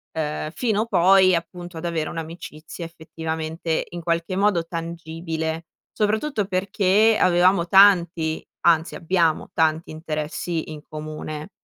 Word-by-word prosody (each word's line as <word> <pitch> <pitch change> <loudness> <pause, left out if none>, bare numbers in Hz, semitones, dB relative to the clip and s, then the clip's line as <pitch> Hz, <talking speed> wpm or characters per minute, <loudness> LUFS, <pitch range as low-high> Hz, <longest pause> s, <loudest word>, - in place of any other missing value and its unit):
uhm, 155 0 -3
fino 220 +2 0
poi 190 -2 +5
appunto, 175 0 -4
ad 160 - -6
avere 165 -2 -1
un'amicizia 165 0 -7
effettivamente 160 0 -4
in 175 0 -7
qualche 170 +2 -1
modo 195 -4 +2
tangibile. 165 -1 -4 0.3
Soprattutto 215 +2 0
perché 195 +3 +2
avevamo 180 0 +4
tanti, 175 -4 +4 0.2
anzi 165 0 +3
abbiamo 165 -2 0
tanti 160 0 +1
interessi 155 +1 -4
in 150 -1 -8
comune. 155 +1 -6
170 Hz, 115 wpm, -23 LUFS, 160-185 Hz, 0.3 s, poi